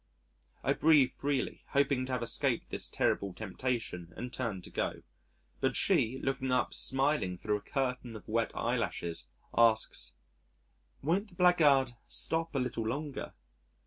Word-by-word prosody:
I -, -, +3 dB
breathe 150 Hz, -5 st, +5 dB
freely 140 Hz, -1 st, -2 dB
hoping 140 Hz, -2 st, +2 dB
to -, -, -5 dB
have 125 Hz, -2 st, -1 dB
escaped 115 Hz, -, 0 dB
this -, -, -1 dB
terrible 100 Hz, -2 st, 0 dB
temptation 110 Hz, -5 st, -3 dB
and 125 Hz, 0 st, -6 dB
turn 105 Hz, -8 st, -3 dB
to -, -, -10 dB
go. -, -, -2 dB, 0.6 s
But -, -, +1 dB
she, 115 Hz, +4 st, +2 dB
looking 135 Hz, -1 st, -1 dB
up 125 Hz, -, +1 dB
smiling 135 Hz, -9 st, +1 dB
thro' 105 Hz, +3 st, 0 dB
a -, -, -11 dB
curtain 125 Hz, -2 st, -2 dB
of 110 Hz, -, -10 dB
wet 115 Hz, +1 st, 0 dB
eyelashes, 85 Hz, -6 st, -1 dB, 0.3 s
asks, 115 Hz, -, +3 dB, 0.9 s
"Won't 180 Hz, +8 st, +1 dB
the 190 Hz, -, -17 dB
blackguard 150 Hz, -8 st, +5 dB, 0.2 s
stop 165 Hz, -1 st, +1 dB
a -, -, +2 dB
little 120 Hz, -3 st, -2 dB
longer?" 140 Hz, +4 st, -4 dB
130 Hz, 145 wpm, -32 LUFS, 115-140 Hz, 0.9 s, breathe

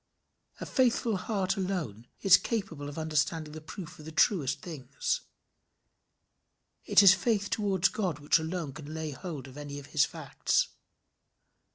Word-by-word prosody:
A -, -, -5 dB
faithful 240 Hz, -4 st, +2 dB
heart 195 Hz, 0 st, -1 dB
alone 170 Hz, -, -3 dB
is 195 Hz, -2 st, +8 dB
capable 185 Hz, -8 st, -2 dB
of 145 Hz, -, -9 dB
understanding 155 Hz, 0 st, -1 dB
the 155 Hz, -, -8 dB
proof 170 Hz, +2 st, -9 dB
of 150 Hz, -, -11 dB
the 160 Hz, -, -7 dB
truest 155 Hz, -, +2 dB
things. 485 Hz, -, -3 dB, 1.6 s
It -, -, +6 dB
is 190 Hz, -2 st, +10 dB
faith 205 Hz, +1 st, 0 dB
towards 195 Hz, -3 st, +2 dB
God 185 Hz, -8 st, -2 dB
which 145 Hz, +3 st, +3 dB
alone 160 Hz, -3 st, -4 dB
can 155 Hz, +1 st, -8 dB
lay 160 Hz, -1 st, -3 dB
hold 145 Hz, -2 st, -7 dB
of 130 Hz, +1 st, -12 dB
any 145 Hz, -1 st, -6 dB
of 145 Hz, -, -8 dB
his 150 Hz, -3 st, +5 dB
facts. -, -, 0 dB
165 Hz, 150 wpm, -30 LUFS, 150-195 Hz, 1.6 s, is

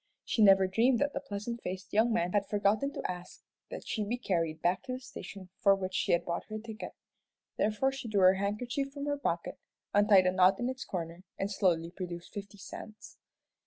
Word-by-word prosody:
She 225 Hz, -, 0 dB
never 195 Hz, -2 st, +7 dB
dreamed 230 Hz, +7 st, +3 dB
that 285 Hz, +4 st, 0 dB
the -, -, -2 dB
pleasant 235 Hz, -2 st, -5 dB
faced 185 Hz, +1 st, -6 dB
young 225 Hz, +3 st, +4 dB
man 180 Hz, -6 st, +1 dB
had 200 Hz, 0 st, +1 dB
forgotten 210 Hz, +6 st, +1 dB
to -, -, -5 dB
ask 180 Hz, 0 st, -6 dB, 0.3 s
that -, -, -7 dB
she 215 Hz, -, -1 dB
be 225 Hz, +4 st, -2 dB
carried 165 Hz, -8 st, -1 dB
back 180 Hz, +1 st, +1 dB
to 255 Hz, -, -3 dB
the 255 Hz, -, -4 dB
station 195 Hz, -6 st, -9 dB
for 200 Hz, -1 st, +5 dB
which 190 Hz, -1 st, -4 dB
she -, -, +1 dB
had 170 Hz, 0 st, +2 dB
bought 170 Hz, 0 st, -3 dB
her 215 Hz, -, -5 dB
ticket. 220 Hz, +1 st, -7 dB, 0.7 s
Therefore 220 Hz, +6 st, +2 dB
she 270 Hz, -3 st, -6 dB
drew 205 Hz, -3 st, +1 dB
her 185 Hz, 0 st, +8 dB
handkerchief 235 Hz, +8 st, -2 dB
from 280 Hz, 0 st, -5 dB
her 290 Hz, -1 st, -1 dB
pocket, 170 Hz, -11 st, -2 dB, 0.3 s
untied 205 Hz, -2 st, +6 dB
a 185 Hz, -, +4 dB
knot 185 Hz, +1 st, +4 dB
in 245 Hz, +1 st, 0 dB
its 260 Hz, 0 st, -5 dB
corner, 170 Hz, -1 st, -5 dB, 0.2 s
and 195 Hz, +1 st, -2 dB
slowly 170 Hz, -4 st, +1 dB
produced 175 Hz, -2 st, -7 dB
fifty 205 Hz, -1 st, -7 dB
cents. 215 Hz, +2 st, -10 dB
200 Hz, 205 wpm, -31 LUFS, 185-230 Hz, 0.7 s, her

